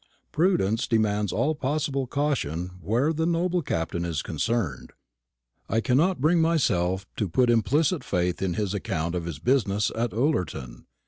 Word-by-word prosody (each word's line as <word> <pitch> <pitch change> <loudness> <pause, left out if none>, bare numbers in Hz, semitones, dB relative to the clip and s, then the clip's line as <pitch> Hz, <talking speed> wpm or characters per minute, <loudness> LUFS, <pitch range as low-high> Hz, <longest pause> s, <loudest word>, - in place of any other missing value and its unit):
Prudence 155 - +1
demands 105 -3 +1
all 155 +2 +1
possible 140 -2 -1
caution 115 - -1
where 120 - +1
the 160 +1 0
noble 175 +1 +1
Captain 85 - -2
is 85 -3 -2
concerned. 105 - -2 0.8
I 110 - +2
cannot 145 +10 +2
bring 165 +5 +3
myself 95 - +1
to 105 - -1
put 125 +7 +3
implicit 145 - +2
faith 90 -1 -1
in 90 -3 -1
his 105 -1 -1
account 85 -4 -2
of 90 -2 -3
his 85 -4 -5
business 105 - +1
at 115 0 -1
Ullerton. 90 - -2
115 Hz, 145 wpm, -26 LUFS, 90-150 Hz, 0.8 s, bring